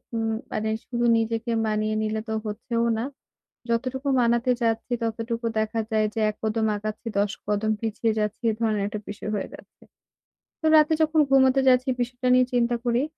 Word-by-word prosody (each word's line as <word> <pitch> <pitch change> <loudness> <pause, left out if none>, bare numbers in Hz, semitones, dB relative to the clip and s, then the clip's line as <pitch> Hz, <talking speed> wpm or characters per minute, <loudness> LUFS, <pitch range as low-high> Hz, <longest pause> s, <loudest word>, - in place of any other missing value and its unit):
উম 225 0 0 0.2
মানে 220 0 -1 0.2
শুধু 240 -1 -1
নিজেকে 225 +1 -1 0.2
মানিয়ে 215 0 0
নিলে 215 0 -1
তো 220 - -1
হচ্ছেও 230 +2 -2
না। 225 - -1 0.7
যতটুকু 255 +4 -1
মানাতে 235 +1 +2
যাচ্ছি 225 +1 -1
ততটুকু 230 +1 -3
দেখা 220 +1 -1
যায় 215 -1 +2
যে 225 - -1
১ 210 - -5
কদম 220 0 0
আগাচ্ছি 215 +2 -6
১০ 205 0 +1 0.2
কদম 210 +1 +1
পিছিয়ে 225 0 0
যাচ্ছি, 210 0 -2
এই - - -4
ধরনের 215 -3 +1
একটা 210 +1 -4
বিষয় 210 +1 -6
হয়ে - - -4
যাচ্ছে। - - -18 0.8
তো - - -4
রাতে 305 +1 +5
যখন 315 0 +3
ঘুমোতে 270 0 +5
যাচ্ছি 255 +1 +3
বিষয়টা 245 +1 -2
নিয়ে 255 0 +5
চিন্তা 240 0 +2
করি 240 +2 +2
225 Hz, 175 wpm, -25 LUFS, 215-245 Hz, 0.8 s, রাতে